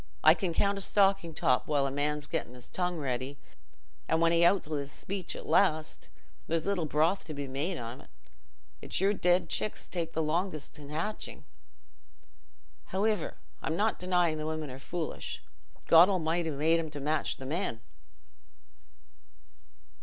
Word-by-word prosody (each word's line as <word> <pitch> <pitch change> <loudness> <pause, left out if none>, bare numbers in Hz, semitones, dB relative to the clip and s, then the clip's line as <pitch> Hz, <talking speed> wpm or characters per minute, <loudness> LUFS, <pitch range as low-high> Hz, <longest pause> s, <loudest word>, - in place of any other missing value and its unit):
I - - +9
can 185 -4 -2
count 200 +4 +1
a - - -5
stocking 195 -5 +2
top 125 -3 +2
while 145 -2 +2
a 135 - -1
man's 145 +1 -1
getting's 125 -4 -4
tongue 180 -1 -2
ready 135 -1 -3 0.7
an' 160 - +2
when 165 0 +4
he 170 0 +4
outs 180 -1 +4
wi' 150 -2 -2
his 140 0 -5
speech 190 +2 -4
at - - -7
last, 155 -5 +2 0.4
there's 165 0 0
little 185 -5 0
broth 160 +6 +2
to 155 - -7
be 140 -1 -4
made 145 +7 -2
on't. 120 0 -7 0.7
It's - - -3
your 195 +2 +3
dead 180 -2 +2
chicks 215 - -1
take 165 -2 -3
the 160 - 0
longest 155 -1 -1
hatchin'. 155 +8 -5 1.4
Howiver, 210 +2 0 0.3
I'm 160 - -1
not 215 +5 +1
denyin' 175 -3 +2
the 155 - -3
women 155 -3 -3
are 130 - -8
foolish: 165 +3 -4 0.4
God 170 +3 +8
Almighty 170 -2 0
made 155 +3 +2
'em 160 -1 -3
to 145 -1 -7
match 150 +3 0
the 135 - -8
men." 150 - -2
160 Hz, 155 wpm, -30 LUFS, 150-180 Hz, 1.4 s, I